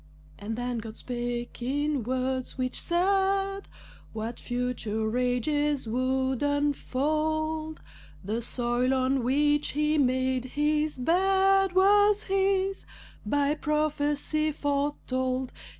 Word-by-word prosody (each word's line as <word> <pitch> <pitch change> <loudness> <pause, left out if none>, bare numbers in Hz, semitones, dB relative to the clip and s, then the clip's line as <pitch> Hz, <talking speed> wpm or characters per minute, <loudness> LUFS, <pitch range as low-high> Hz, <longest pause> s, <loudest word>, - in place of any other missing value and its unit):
And 220 +2 -4
then 245 0 -3
God 220 0 -8
spake 240 -1 -4
in 285 +3 0
words 255 +2 -2
which 255 -1 -2
said 390 +2 +1 0.5
What 225 +2 -5
future 235 -3 -2
ages 260 +3 0
would 260 +2 0
unfold, 310 +2 -1 0.4
The 215 +5 -2
soil 240 +2 0
on 260 0 +1
which 295 +3 +2
he 300 +1 +1
made 260 -1 +1
his 300 0 +1
bed 385 +6 +3
Was 410 +2 +5
his, 390 0 0 0.4
by 285 +4 +2
prophecy 300 0 0
foretold. 265 -3 -1
285 Hz, 100 wpm, -27 LUFS, 250-310 Hz, 0.5 s, Was